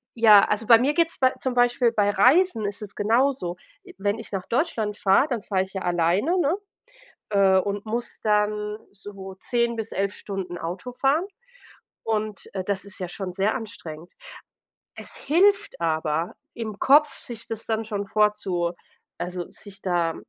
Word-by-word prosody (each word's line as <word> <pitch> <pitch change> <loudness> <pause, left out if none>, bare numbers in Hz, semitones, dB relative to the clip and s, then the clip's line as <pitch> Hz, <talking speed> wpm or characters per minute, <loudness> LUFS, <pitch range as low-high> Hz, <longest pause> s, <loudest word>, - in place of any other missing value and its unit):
j 230 -1 0
ja, 205 -2 +9
also 210 +1 -1
bei 230 - +9
mir 270 +6 +1
geht's 335 0 +1
bei 260 -1 +4
zum 255 -1 -2
Beispiel 245 0 +3
bei 205 -2 +2
Reisen 255 - +4
ist 205 +2 -4
es 200 - -9
genauso, 225 -4 +1 0.3
i 370 - -13
wenn 205 +3 -1
ich 225 - -10
nach 190 -2 -3
Deutschland 230 -6 -1
fahre, 195 +8 +4
dann 240 -5 -2
fahre 195 -3 0
ich 190 +1 -12
ja 190 - -4
alleine, 175 - +1
ne, 335 +3 +2 0.7
äh, 195 -2 +4
und 200 +2 -3
muss 235 +2 -4
dann 210 0 0
so 195 -1 -10
10 235 -1 0
bis 225 -1 -5
11 200 +1 -1
Stunden 190 -4 -6
Auto 180 +10 -5
fahren 275 +7 +1 0.8
und, 215 -2 -3
äh, 190 - -2
das 200 0 -2
ist 200 - -10
ja 180 -2 -4
schon 180 0 -5
sehr 200 +5 +1
anstrengend. 175 -8 -8 0.9
Es - - -8
hilft 395 - +2
aber 160 0 -1 0.2
im 220 -3 -6
Kopf, 295 +2 +6
sich 235 -2 -7
das 225 -1 -5
dann 225 0 -1
schon 205 -2 -4
vorzu 195 -5 +1 0.5
also 180 0 -4
sich 200 -1 -12
da 175 -3 0
210 Hz, 170 wpm, -24 LUFS, 190-240 Hz, 0.9 s, ja